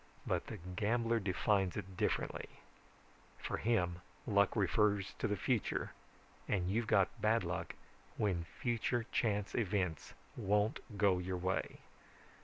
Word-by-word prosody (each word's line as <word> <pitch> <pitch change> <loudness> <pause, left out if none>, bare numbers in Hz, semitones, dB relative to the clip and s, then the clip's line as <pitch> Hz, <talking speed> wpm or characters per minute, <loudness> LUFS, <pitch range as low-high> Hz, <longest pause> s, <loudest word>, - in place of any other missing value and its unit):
But - - -1
the 110 - -5
gambler 110 +6 0
defines 95 -1 +1
it 95 -2 -6
differently. - - -1 0.9
For - - -3
him, 90 -7 +1 0.2
luck 100 -3 +3
refers 105 -1 +2
to - - +1
the 105 - 0
future, 120 -1 0 0.6
and 95 -2 0
you've 115 +2 0
got 100 +3 +2
bad 110 0 +3
luck 85 0 -3 0.4
when 90 -6 0
future 120 0 0
chance 105 -3 0
events 95 - -1 0.2
won't 105 +7 +1 0.2
go 100 -3 +4
your 90 +1 -2
way. 95 +2 -2
100 Hz, 125 wpm, -36 LUFS, 90-110 Hz, 0.9 s, go